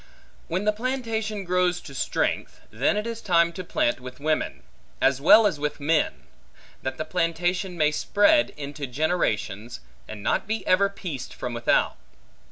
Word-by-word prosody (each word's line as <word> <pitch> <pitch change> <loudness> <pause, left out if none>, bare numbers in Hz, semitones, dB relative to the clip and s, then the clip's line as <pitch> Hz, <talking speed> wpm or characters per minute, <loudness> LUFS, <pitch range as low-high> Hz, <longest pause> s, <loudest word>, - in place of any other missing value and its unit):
When 185 +4 -2
the 210 - +4
plantation 225 -3 -2
grows 180 0 +1
to 140 - -11
strength, 135 - -1
then 130 - +1
it 210 - -2
is 230 0 -5
time 170 -2 +3
to 185 - -6
plant 120 -8 0
with 125 0 -10
women, 155 - -1 0.4
as 135 0 +2
well 215 +9 +8
as 165 -8 +1
with 150 0 -2
men; 155 +2 +1 0.6
that 130 0 -4
the 155 - -3
plantation 175 +2 -1
may 150 -2 +3
spread 205 - +3
into 145 0 -5
generations, 120 - -1 0.3
and 105 -2 -8
not - - 0
be 220 +1 -2
ever 200 +2 +4
pieced 165 -10 -7
from 125 - -5
without. 120 0 +1
170 Hz, 160 wpm, -25 LUFS, 140-200 Hz, 0.6 s, well